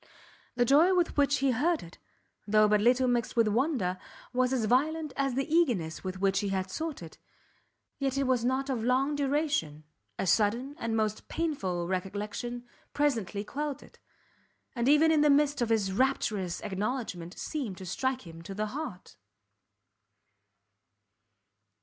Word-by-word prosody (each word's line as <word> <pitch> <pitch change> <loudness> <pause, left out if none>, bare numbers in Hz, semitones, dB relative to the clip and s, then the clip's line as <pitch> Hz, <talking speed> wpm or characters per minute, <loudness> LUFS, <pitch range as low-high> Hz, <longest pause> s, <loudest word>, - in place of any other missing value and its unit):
The 245 0 +3
joy 315 +9 +5
with 350 -2 +1
which 285 -1 +3
he 265 - +4
heard 310 +7 +1
it, 170 +1 -13 0.5
though 215 +1 +5
but 210 0 +3
little 250 +3 +4
mixed 240 -2 0
with 230 -2 +4
wonder, 215 - 0 0.3
was 250 0 +2
as 250 -4 +1
violent 300 +5 +1
as 275 -2 0
the 270 +1 -1
eagerness 245 - +1
with 185 0 -5
which 195 0 +2
he 200 - -2
had 190 -1 -2
sought 315 - -4
it; 160 - -12 0.8
yet 270 -1 -1
it 275 - +2
was 255 -3 +1
not 260 +2 0
of 235 -4 -2
long 265 +4 +2
duration, 280 - -1 0.3
a - - -1
sudden, 230 +8 +1
and 225 -1 -1
most 215 -1 -1
painful 190 - -2
recollection 210 +6 -4 0.3
presently 225 -9 0
quelled 290 +4 -4
it, - - -19 0.8
and 240 +1 +1
even 305 +2 +5
in 310 -2 +4
the 300 - +4
midst 290 -1 +3
of 235 - +1
his 210 -4 +1
rapturous 210 -7 0
acknowledgment, 200 -4 -4
seemed 255 - -4
to 185 - -8
strike 260 +6 -2
him 165 -1 -10
to 195 +3 -8
the 215 +1 -1
heart. 285 - -7
245 Hz, 155 wpm, -29 LUFS, 200-280 Hz, 0.8 s, joy